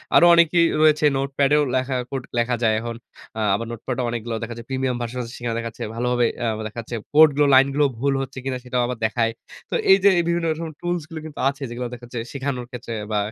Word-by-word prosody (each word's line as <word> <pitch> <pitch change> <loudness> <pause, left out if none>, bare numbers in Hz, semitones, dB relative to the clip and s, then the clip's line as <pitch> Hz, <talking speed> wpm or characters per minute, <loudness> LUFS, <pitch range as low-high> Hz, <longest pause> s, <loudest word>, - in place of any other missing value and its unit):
আরো 175 - +8
অনেকেই 170 0 +5 0.2
রয়েছে 155 -1 +4
নোটপ্যাডেও 140 +2 +2
লেখা 130 0 0
কোড 135 -2 -4
লেখা 120 +1 +1
যায় 110 -1 +4
এখন। 115 0 -5 0.4
আ - - -2 0.2
আবার 115 +3 -3
নোটপ্যাডও 125 +2 -4
অনেকগুলো 115 -1 -3
দেখা 120 - -5
যাচ্ছে 115 - -9
প্রিমিয়াম 130 -1 -1
ভার্সন 120 0 -4
আছে 115 0 -7
সেখানে 120 -1 -3
দেখা 115 0 -4
যাচ্ছে 110 - -8
ভালোভাবে 125 0 +1
অ্যা 115 - 0 0.2
দেখা 110 +2 -8
যাচ্ছে 120 +1 -7 0.2
কোড 155 +1 +8
গুলো 145 0 +4
লাইন 135 +1 +7
গুলো 145 0 +3
ভুল 140 +1 +1
হচ্ছে 135 0 -7
কিনা 130 -1 -2
সেটাও 125 0 -1
আবার 125 -2 -4
দেখায়। 115 +1 +1 0.4
তো - - -2 0.2
এই 195 - +8
যে 200 - +8
এ - - +4
বিভিন্ন 170 0 0
রকম 160 +1 -5
টুলস 175 0 -1
গুলো 160 -1 -6
কিন্তু 155 -2 -9
আছে 140 +1 -8
যেগুলো 120 +1 -4
দেখা 120 0 -9
যাচ্ছে 120 -1 -5
শেখানোর 135 -3 -3
ক্ষেত্রে 120 -1 -6 0.2
বা 105 - +1
130 Hz, 230 wpm, -22 LUFS, 120-145 Hz, 0.4 s, আরো